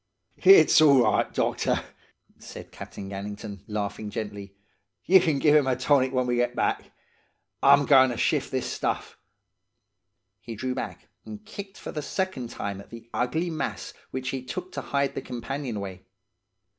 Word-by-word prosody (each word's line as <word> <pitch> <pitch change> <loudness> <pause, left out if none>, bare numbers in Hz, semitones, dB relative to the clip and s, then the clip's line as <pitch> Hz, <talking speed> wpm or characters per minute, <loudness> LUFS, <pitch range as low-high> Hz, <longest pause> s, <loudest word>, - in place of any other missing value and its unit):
"'It's 390 - +7
all 140 -5 +6
right, 110 - +1
doctor,' - - 0 0.6
said - - -11
Captain 95 - -9
Gannington, 100 +1 -7
laughing 105 0 -4
gently. 100 -2 -6 0.5
'Ye 190 +2 +7
can 160 -5 +1
give 150 +2 +4
him 145 -3 +4
a 130 - +2
tonic 130 0 +2
when 130 -1 0
we 120 -1 0
get 120 0 0
back. - - -1 0.7
I'm 140 +1 +6
goin' 130 -2 +6
to 120 - -4
shift - - +1
this - - -2
stuff.' - - -3 1.2
He 115 - -8
drew 130 +4 -3
back, - - -6 0.2
and 110 -1 -10
kicked 200 0 -9
for - - -7
the 150 - -4
second 165 -6 -3
time 100 -3 -5
at - - -17
the 115 0 -12
ugly 160 +8 -1
mass 155 - -4 0.2
which 130 0 -4
he 130 -1 -4
took 180 +8 -6
to - - -5
hide 140 -1 -1
the - - -4
companionway. 115 -7 -5
125 Hz, 160 wpm, -26 LUFS, 110-145 Hz, 1.2 s, It's